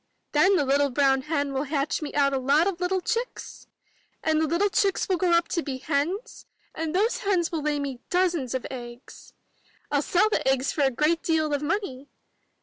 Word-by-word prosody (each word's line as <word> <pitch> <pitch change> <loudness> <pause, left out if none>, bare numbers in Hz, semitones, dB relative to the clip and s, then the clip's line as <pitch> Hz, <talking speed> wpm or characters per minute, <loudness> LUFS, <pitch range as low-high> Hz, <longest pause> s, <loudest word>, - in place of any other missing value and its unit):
Then 375 +7 +4
the 295 - +2
little 280 +1 +2
brown 270 0 +2
hen 285 -1 -2
will 270 +2 -1
hatch 285 +2 -1
me 300 - -4
out 280 -1 +3
a 270 - +1
lot 280 +5 +3
of 370 -2 -2
little 365 +1 0
chicks! 465 +5 -4 0.6
And 315 0 +2
the 320 - +1
little 345 +7 +1
chicks 395 -1 +1
will 375 -3 +1
grow 360 +1 +1
up 340 0 +3
to 335 - -1
be 275 -4 -4
hens, 320 - -3 0.3
and 320 +1 -3
those 430 +5 +1
hens 370 -5 0
will 325 -2 -2
lay 295 0 -1
me 275 -3 -4
dozens 345 -8 0
of 260 - -3
eggs. 240 0 -10 0.6
TU 285 - +3
sell 365 +7 +2
the - - 0
eggs 270 0 +2
for 300 - -2
a 275 - +4
great 305 +6 +1
deal 315 -2 0
of 285 - 0
money! 295 -5 -3
305 Hz, 205 wpm, -26 LUFS, 275-360 Hz, 0.6 s, Then